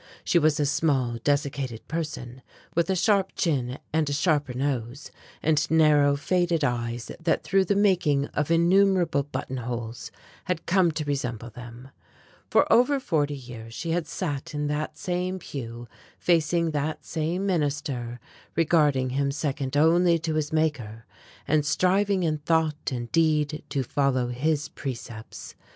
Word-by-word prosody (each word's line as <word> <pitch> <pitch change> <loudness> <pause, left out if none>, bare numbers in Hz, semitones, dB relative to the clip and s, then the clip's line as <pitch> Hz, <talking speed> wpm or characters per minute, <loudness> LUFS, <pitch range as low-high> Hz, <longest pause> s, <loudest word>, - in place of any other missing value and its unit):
She 175 - +3
was 155 -2 +2
a 145 - +2
small 135 -5 +1
desiccated 140 -5 -1
person, 145 -6 -5 0.3
with 170 +2 +1
a 190 - +2
sharp 195 +1 +2
chin 130 -6 0 0.2
and 160 -2 +1
a - - -1
sharper 145 -4 +1
nose, 130 -1 -3 0.3
and 155 -1 +2
narrow 150 -3 +4
faded 170 +1 0
eyes 120 -2 -2
that 165 -1 0
through 195 0 +2
the 200 - +1
making 180 -9 +3
of 150 0 -2
innumerable 175 -1 +3
buttonholes 120 -4 -5 0.4
had 180 -3 -2
come 180 -2 +3
to 155 -1 -3
resemble 125 -5 -3
them. 120 +2 -11 0.6
For - - +4
over 275 +4 +4
forty 150 - 0
years 115 -4 -10
she 165 - -3
had 170 -1 -1
sat 145 -4 -4
in 150 0 -1
that 150 +1 -2
same 180 +1 -2
pew 120 -8 -7 0.3
facing 170 0 +2
that 150 +1 -3
same 165 +4 -2
minister, 140 -8 -2 0.4
regarding 150 -5 +2
him 140 +1 0
second 140 -1 -2
only 170 +3 +4
to 160 -1 -3
his 155 -1 -1
Maker, 130 -9 -1 0.4
and 150 0 +3
striving 185 +5 +2
in 155 -2 0
thought 155 -1 0
and 120 -2 -4
deed 155 -2 +2
to 140 -2 -1
follow 130 -1 0
his 150 +5 0
precepts. 115 -4 -7
150 Hz, 145 wpm, -26 LUFS, 130-165 Hz, 0.6 s, narrow